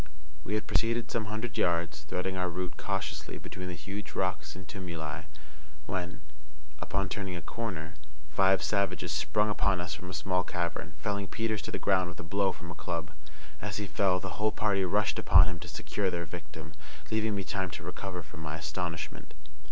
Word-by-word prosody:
We 105 - 0
had 110 - 0
proceeded 115 +1 +2
some 115 -2 +1
hundred 110 +3 -2
yards, 85 -2 +2
threading 90 +4 -1
our 90 -1 +1
route 90 0 -2
cautiously 95 -5 -2
between 90 0 -6
the 90 - -3
huge 100 +4 -5
rocks - - 0
and 95 +1 -8
tumuli, 85 -4 -4 0.6
when, 90 0 -2 0.6
upon 100 0 0
turning 95 -2 -2
a 85 - -3
corner, 95 -9 -3 0.3
five 95 +3 +5
savages 95 -4 +2
sprung 75 +8 +3
upon 100 -2 +3
us 85 -1 -2
from 90 - -6
a 90 - -4
small 90 0 +2
cavern, 85 -1 -2
felling 100 -1 -1
Peters 110 -1 0
to - - -5
the - - 0
ground 95 -2 +3
with 90 - -9
a - - -4
blow 95 +4 +3
from 85 -1 -8
a - - -3
club. 85 +2 -2 0.5
As 105 -1 -2
he 105 - -1
fell 95 -2 +3
the 95 +1 -4
whole 110 0 +5
party 100 -3 +3
rushed 105 +3 +3
upon - - +8
him 90 -2 -2
to 90 - -7
secure 95 +4 0
their 85 -1 -1
victim, 80 -1 -7 0.4
leaving 110 -1 +2
me 100 - 0
time 95 0 0
to - - -6
recover 90 -1 -4
from 75 +1 -10
my 80 -1 -3
astonishment. 85 -1 -3
90 Hz, 190 wpm, -32 LUFS, 85-100 Hz, 0.6 s, upon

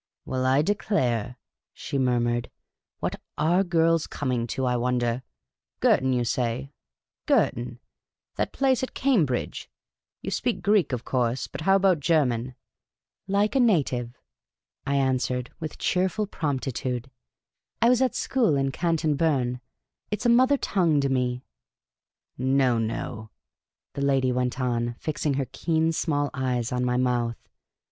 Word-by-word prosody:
" - - -63
Well, 130 0 -1
I 135 +3 +4
declare," 125 - 0 0.4
she 140 - -3
murmured. 120 -2 +1 0.3
" - - -65
What - - -3 0.2
are 170 +5 +3
girls 165 -2 +2
coming 125 -4 -2
to, 130 +2 -2
I 125 -1 +1
wonder? 120 0 0 0.6
Girton, 130 0 +3
you 125 -1 +1
say; 125 +3 -2 0.6
Girton! 120 0 +1 0.6
That - - -1
place 265 -2 +2
at 260 - -4
Cam 250 - +3
bridge! 125 -1 -3 0.5
You - - -3
speak - - -1
Greek, 205 -5 +3
of 125 -2 -3
course; 125 -1 0
but - - -8
how 195 +4 +4
about 190 -4 +3
Ger 155 0 +3
man? 120 +1 -3 0.2
" - - -66
" - - -33
lyike 200 +2 +2
a 270 - +2
native," 135 - +1 0.7
I 140 - +1
answered, 125 -2 0
with 155 -2 -6
cheerful 190 +4 0
promptitude, 135 - -3 0.3
'* - - -60
I - - +6
was 250 0 +4
at 260 - +1
school 235 - +1
in 135 0 0
Canton 160 -1 0
Berne; 130 -5 0 0.5
it 210 -1 -3
is - - -6
a - - +5
mother 255 +4 +5
tongue 170 - +1
to 140 - 0
me. 125 -1 -1 0.2
' - - -68
' - - -68
" - - -54
No, 130 -2 +2
no," 110 -1 -4 0.6
the 140 - -4
old 140 - +2
lady 135 -2 +2
went 125 +1 -1
on, 120 -2 -1
fixing 150 -2 -2
her 135 -1 0
keen 160 +3 +1
small 145 -3 -1
eyes 125 -4 -1
on 125 0 0
my 125 0 +1
mouth. 120 -2 0
135 Hz, 165 wpm, -26 LUFS, 125-165 Hz, 0.7 s, I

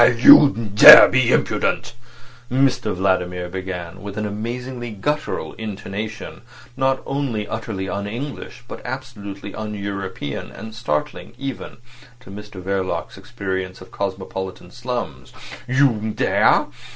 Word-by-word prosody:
"Aha! 120 0 +5
You 140 +4 +9 0.2
dare 105 - +11
be - - +2
impudent," - - 0 0.6
Mr 130 -4 +1
Vladimir 90 -1 -1
began, 95 -1 -6
with 100 0 -8
an 110 - -2
amazingly 120 +4 -5
guttural 150 +9 -3
intonation 105 0 -6 0.3
not 135 0 0
only 135 -7 -2
utterly 110 -4 -5
un 100 +2 -4
English, 125 +2 -7
but - - -8
absolutely 100 -6 -7
un 105 -1 -5
European, 100 -7 -5
and 110 0 -10
startling 95 -1 -3
even 135 -2 -6 0.4
to 110 - -14
Mr 105 -1 -10
Verloc's 95 0 -3
experience 95 -1 -5
of 95 - -14
cosmopolitan 95 -2 -5
slums. 125 0 -6 0.3
"You 120 -5 +2
dare! - - +3
105 Hz, 120 wpm, -21 LUFS, 95-120 Hz, 0.6 s, dare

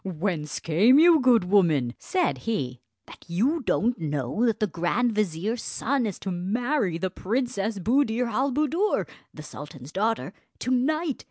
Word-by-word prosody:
"Whence 170 -4 -3
came 205 - +4
you, 330 +1 +7
good 250 -6 +4
woman," 165 -10 +2
said 365 -2 -1
he, 130 - -2 0.2
"that - - -14
you 245 - 0
don't 240 0 0
know 150 - -1
that 225 - 0
the 215 - +2
grand 195 +7 0
vizier's 210 +3 -1
son 260 -1 -1
is 200 - -5
to 195 - -5
marry 200 - -1
the 185 +1 -3
Princess 215 0 -2
Buddir 235 +3 +1
al 260 +4 0
Buddoor, 305 +9 0 0.2
the 155 - -10
sultan's 145 -2 -10
daughter, 215 0 -1 0.2
to 255 - -3
night? 295 +4 0
215 Hz, 155 wpm, -25 LUFS, 175-255 Hz, 0.2 s, you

